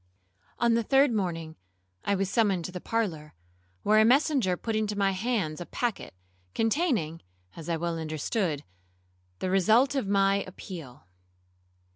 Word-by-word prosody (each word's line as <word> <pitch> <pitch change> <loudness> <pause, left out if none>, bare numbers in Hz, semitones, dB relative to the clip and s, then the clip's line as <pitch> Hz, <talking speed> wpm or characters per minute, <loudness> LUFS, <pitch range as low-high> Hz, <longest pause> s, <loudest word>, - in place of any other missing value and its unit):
'On 235 -1 +3
the 230 - +3
third 270 +4 +4
morning 165 -6 -2 0.5
I 200 - +1
was 195 0 0
summoned 195 -5 +1
to - - -5
the 180 -1 -6
parlour, 175 - -2 0.5
where 215 +1 +5
a - - +7
messenger 250 - +3
put 225 +3 -3
into 210 -1 -1
my 195 -1 +2
hands 190 -6 -1
a - - -5
packet, 235 - -3 0.4
containing 225 - 0 0.3
(as 165 0 -8
I 165 - +1
well 170 0 -2
understood) 155 +1 -2 0.7
the 185 - -2
result 220 +9 +4
of 270 -7 -1
my 195 0 +3
appeal. 165 - -9
195 Hz, 145 wpm, -28 LUFS, 170-230 Hz, 0.7 s, a